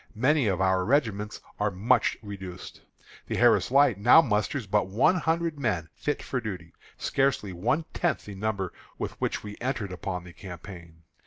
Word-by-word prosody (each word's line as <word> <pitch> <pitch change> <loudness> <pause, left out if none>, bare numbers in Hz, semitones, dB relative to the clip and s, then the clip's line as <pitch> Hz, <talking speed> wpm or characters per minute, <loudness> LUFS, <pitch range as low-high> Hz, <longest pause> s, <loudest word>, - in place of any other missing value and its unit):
Many 130 +3 +3
of 95 -3 0
our 95 -1 +2
regiments 105 -4 0 0.2
are 105 0 +2
much 100 +4 +2
reduced. 95 -3 -8 0.5
The - - -2
Harris - - +4
Light 130 -6 +4
now 120 +9 +8
musters 110 +2 0
but 105 0 +1
one 110 - +3
hundred 165 -1 0
men 90 - -1
fit 150 - -3
for 125 - -2
duty, 90 -7 -6 0.2
scarcely 135 -8 0
one 120 - 0
tenth 175 - 0
the 105 - -8
number 95 -2 -2 0.2
with - - -3
which - - -1
we 105 -1 -8
entered 120 -6 -2
upon 90 -1 -4
the 90 -1 -12
campaign. 85 -3 -11
105 Hz, 165 wpm, -27 LUFS, 95-130 Hz, 0.5 s, now